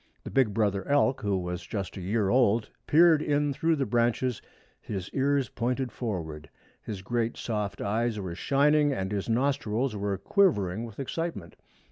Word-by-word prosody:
The - - -7
big 130 -6 +3
brother 100 -2 0
elk, 140 -2 +2
who 100 -2 0
was 90 0 -4
just 100 +1 -5
a 95 - -6
year 100 +2 0
old, 115 -2 +3 0.2
peered 160 0 +6
in 145 -1 +1
through 165 +4 +1
the 140 -3 0
branches, 120 0 0 0.4
his 95 -2 -5
ears 140 -2 +1
pointed 125 +2 -2
forward. 80 -11 -5 0.3
His 100 -3 -6
great 120 +2 -1
soft 105 -3 -3
eyes 110 +2 0
were 95 -3 -4
shining, 145 - +3
and 95 -7 -2
his 100 +1 -2
nostrils 130 -1 0
were 100 -1 -2
quivering 110 - +2
with 110 0 -11
excitement. 135 - -4
115 Hz, 160 wpm, -28 LUFS, 100-135 Hz, 0.4 s, peered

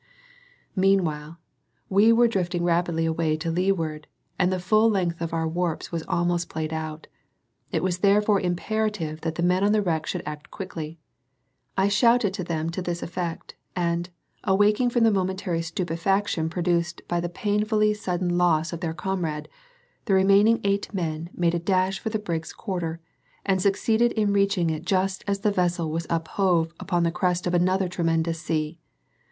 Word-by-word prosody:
Meanwhile, 170 -5 +1 0.5
we 205 +4 +5
were 235 +1 +5
drifting 180 -5 -1
rapidly 170 -1 +1
away 160 -1 0
to 165 +1 -2
leeward, 165 -4 -1 0.3
and 180 0 +3
the 185 - 0
full 215 +5 +4
length 175 -5 0
of 165 - -2
our 165 -1 0
warps 170 0 -2
was 165 -1 -2
almost 175 0 0
paid 160 0 -3
out; 155 0 -5 0.7
it - - 0
was 180 -1 0
therefore 205 +1 +4
imperative 180 -3 -2
that 160 0 -3
the 170 - -1
men 180 +2 +2
on 205 +1 +3
the 215 - +3
wreck 160 -4 -1
should - - -3
act 150 0 -7
quickly. 165 -4 -6 0.8
I 190 +1 +4
shouted 230 0 +3
to 190 -2 -3
them 165 -1 -2
to 175 - -4
this 175 -1 -3
effect, 170 -1 -5 0.2
and, 170 0 -1 0.3
awaking 210 +5 +3
from 240 -1 +2
the 225 - +5
momentary 190 -3 -1
stupefaction 170 +1 -1
produced 170 0 -1
by 175 - 0
the 175 0 -2
painfully 210 +2 +1
sudden 180 -3 -1
loss 165 -2 +2
of 170 - -4
their 160 -1 -3
comrade, 165 -3 -3 0.6
the 195 - +3
remaining 200 +4 +5
eight 200 0 0
men 165 -4 -3
made 170 -1 +1
a 170 - 0
dash 185 +2 +1
for 220 - -3
the 215 - -1
brig's 170 -6 -4
quarter, 175 -6 -4 0.5
and 190 -2 +2
succeeded 220 +4 +2
in 210 -2 +1
reaching 200 -4 +2
it 155 0 -4
just 190 +1 0
as 200 -1 -1
the 210 0 +2
vessel 175 -4 0
was 165 +1 -3
uphove 165 0 +1
upon 175 -3 0
the 170 - +2
crest 180 +1 0
of 175 - -1
another 185 +2 +2
tremendous 165 -2 0
sea. 155 +1 -2
175 Hz, 170 wpm, -25 LUFS, 165-195 Hz, 0.8 s, we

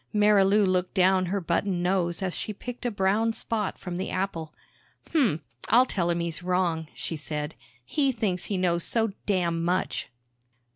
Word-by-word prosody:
Marilou 210 -1 +5
looked 185 0 0
down 185 -1 +4
her 200 +3 0
button 175 +1 0
nose 180 -1 +1
as 185 -2 -2
she 215 - -4
picked 245 +4 -5
a - - +1
brown 210 +2 +1
spot 220 -2 -2
from 180 -2 -5
the 185 - -3
apple. 170 -5 -2 0.6
"Hmmph, 235 - +2 0.3
I'll 245 +3 +6
tell 175 -8 0
'im 170 0 +1
he's 170 0 -3
wrong," 175 -3 0
she 165 - -4
said. 150 0 -4 0.3
"He 275 - +1
thinks 210 -7 -2
he 200 - -2
knows 175 -2 +1
so 225 -3 0
damn 170 -4 +1
much!" 180 +2 -1
185 Hz, 165 wpm, -27 LUFS, 170-210 Hz, 0.6 s, I'll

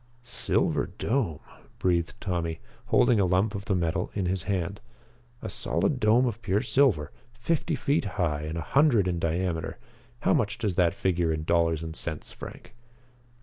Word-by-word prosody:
"Silver 125 +1 0
Dome," 105 - -1 0.4
breathed 85 -2 0
Tommy, 85 -4 -2 0.3
holding 120 -3 +4
a 100 - +4
lump 95 +4 +2
of 100 -1 -5
the 100 - +1
metal 90 +1 0
in 100 -3 0
his 90 0 0
hand. 100 +1 -1 0.6
"A - - -3
solid 100 - 0
dome 115 +3 +4
of 115 -2 -3
pure 105 +1 +1
silver 115 - +2 0.2
fifty 130 +7 -1
feet 145 -2 0
high 80 -6 0
and 80 +2 -4
a - - -2
hundred 120 - +3
in 85 -2 -1
diameter. 85 0 -1 0.4
How - - +3
much 100 -1 +1
does 105 -4 -1
that 85 -1 +2
figure 85 -3 +1
in 80 -1 -2
dollars 80 -1 +2
and 80 0 -6
cents, 80 -3 -4
Frank?" - - -10
90 Hz, 165 wpm, -27 LUFS, 85-110 Hz, 0.6 s, holding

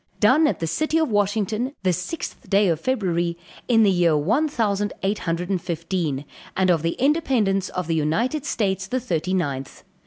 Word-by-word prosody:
"Done 270 +9 +5
at - - 0
the 165 - -1
City 310 - 0
of 320 -2 +1
Washington, 210 +5 0
the 185 -1 +2
sixth 180 - -5
day 200 0 +4
of 165 -3 0
February, 175 -7 -1 0.3
in 225 -2 +5
the 200 - +5
year 175 -4 +3
one 225 - +2
thousand 205 -7 -1
eight 200 +2 0
hundred 175 +3 -2
and 185 -3 0
fifteen, 165 -4 -2 0.3
and 185 -1 +3
of 165 -3 +2
the 165 +1 0
independence 250 - +1
of 180 -1 -3
the 165 - -1
United 190 - 0
States 195 -8 -1
the 255 +5 -1
thirty 185 -5 -1
ninth. 140 -7 -3
195 Hz, 185 wpm, -23 LUFS, 170-230 Hz, 0.3 s, Done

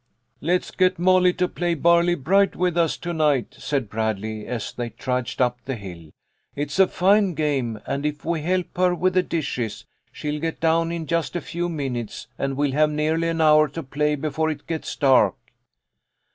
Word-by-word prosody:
" 120 - -50
Let's 180 +4 0
get 185 0 +2
Molly 180 0 +4
to 180 0 0
play 175 -1 -1
Barley 170 +2 +4
bright 195 +7 +2
with 180 -1 0
us 170 -2 +1
to 175 - -4
night," 150 -6 +1
said 140 -5 -2
Bradley, 110 0 -3
as 120 -3 -4
they 120 -1 -4
trudged 125 +1 -3
up 125 -1 +1
the 135 -1 -3
hill. 90 -7 -10 0.2
" - - -44
It 145 0 -3
is 170 - -4
a 190 - +7
fine 195 0 +3
game, 135 -8 -1
and 140 - -3
if 150 -1 -3
we 165 -1 -1
help 180 +3 -1
her 180 -1 +3
with 185 +2 +1
the 185 - +4
dishes, 140 - -3 0.3
she'll 150 0 -4
get 165 0 -3
done 165 0 +2
in 170 -1 -4
just 170 +2 -1
a - - +1
few 175 +1 -3
minutes, 130 -8 -4
and 135 -1 -2
we'll 145 -1 +1
have 150 +3 +3
nearly 155 +2 0
an 165 -1 -1
hour 155 -1 +6
to 165 +4 -7
play 150 +3 0
before 155 +2 -1
it 145 -2 -5
gets 160 -2 -4
dark." 135 -3 +4
155 Hz, 200 wpm, -23 LUFS, 135-170 Hz, 0.3 s, a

